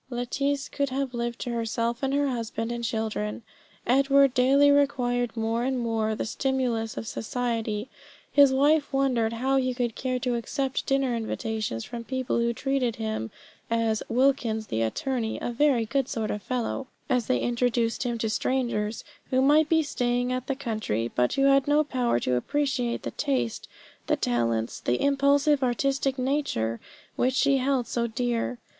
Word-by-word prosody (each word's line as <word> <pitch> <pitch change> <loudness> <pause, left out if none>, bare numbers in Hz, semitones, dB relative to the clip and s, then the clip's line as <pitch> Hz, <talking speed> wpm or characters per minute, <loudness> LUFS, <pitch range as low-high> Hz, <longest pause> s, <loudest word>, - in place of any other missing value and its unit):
Lettice 275 +3 -1
could 280 -1 -2
have 265 0 -2
lived 235 0 -3
to 245 - -3
herself 230 +1 -1
and 270 -1 0
her 285 +1 +2
husband 230 -2 -3
and 235 0 -4
children. 220 -1 -2 0.4
Edward 275 +1 +4
daily 275 +3 +5
required 245 -4 +1
more 225 +1 0
and 260 +1 0
more 225 -2 0
the - - -3
stimulus 240 -3 -1
of - - -4
society. 225 -1 -2 0.4
His 280 -1 +6
wife 290 +3 +3
wondered 255 -5 +1
how 265 +4 +1
he 255 -1 0
could 240 -2 -1
care 255 +2 -2
to 250 -1 0
accept 260 +3 -2
dinner 270 -3 +1
invitations 220 - -3
from 235 -1 -6
people 260 0 -1
who 235 0 +2
treated 255 -1 -1
him 220 - -3 0.4
as 230 -1 +1
"Wilkins 240 -3 +1
the 110 - +1
attorney, 225 - -1
a - - -3
very 245 -2 +2
good 270 +3 -1
sort 220 -2 -2
of 210 - -4
fellow," 255 +3 -3 0.2
as 250 -4 +1
they 255 - +2
introduced 240 -1 0
him 240 -2 -1
to 225 - -1
strangers 230 -4 -1 0.3
who 260 - +2
might 295 +3 +4
be 320 -1 +4
staying 245 -3 -1
in 255 0 -1
the 275 - -1
country, 215 - -2
but 125 0 +1
who 275 - +1
had 275 0 +4
no 295 +1 +4
power 250 - 0
to 125 - 0
appreciate 255 - -1
the 115 - -4
taste, 120 -4 -2 0.4
the - - +3
talents, 115 -1 -1
the 120 - 0
impulsive 280 +1 +3
artistic 270 +2 0
nature 255 - -1 0.4
which 255 +1 +1
she 275 0 +3
held 260 -1 +1
so 235 0 -1
dear. 240 +1 -1
245 Hz, 165 wpm, -26 LUFS, 225-270 Hz, 0.4 s, His